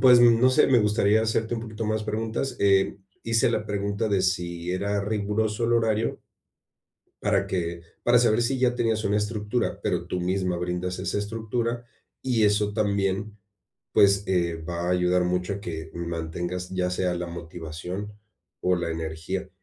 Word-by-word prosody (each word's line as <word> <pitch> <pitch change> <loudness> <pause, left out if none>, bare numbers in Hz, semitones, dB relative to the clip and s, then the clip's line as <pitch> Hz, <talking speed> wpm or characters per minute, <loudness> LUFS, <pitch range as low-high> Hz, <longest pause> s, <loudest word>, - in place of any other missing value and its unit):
Pues, 125 -2 +8
no 120 +1 +6
sé, 130 - +5
me 125 -3 +5
gustaría 105 +1 +3
hacerte 110 +1 0
un 115 - -3
poquito 110 -1 -5
más 110 0 0
preguntas, 110 +5 -2
eh, 100 0 +3 0.2
hice 115 -1 +2
la 105 - -1
pregunta 100 +1 -1
de 100 -2 +2
si 90 -2 -1
era 100 +2 0
riguroso 105 +2 -1
el 120 - +2
horario 115 -1 +1 1.0
para 100 -1 +2
que 85 -3 -2 0.2
para 120 0 +6
saber 120 -1 +3
si 130 +2 0
ya 125 -1 +2
tenías 115 -2 +1
una 100 +1 +2
estructura, 105 +2 -1
pero - - -1
tú 90 - -2
misma 90 0 0
brindas 90 +1 -3
esa 100 +2 -1
estructura, 115 +3 -2 0.4
y 120 -4 +2
eso 105 0 +2
también, 100 0 0 0.6
pues, 100 0 +5
eh, 85 -3 +1
va 85 +2 -4
a - - +1
ayudar 90 0 +2
mucho 90 +2 0
a 100 - -6
que 80 -3 -6
mantengas, 85 +1 -4
ya 90 -1 -1
sea 90 0 0
la 90 0 -3
motivación 85 +4 -6 0.5
o 90 0 +2
la 85 -1 -2
energía, 80 +4 -4
100 Hz, 165 wpm, -26 LUFS, 90-110 Hz, 1.0 s, Pues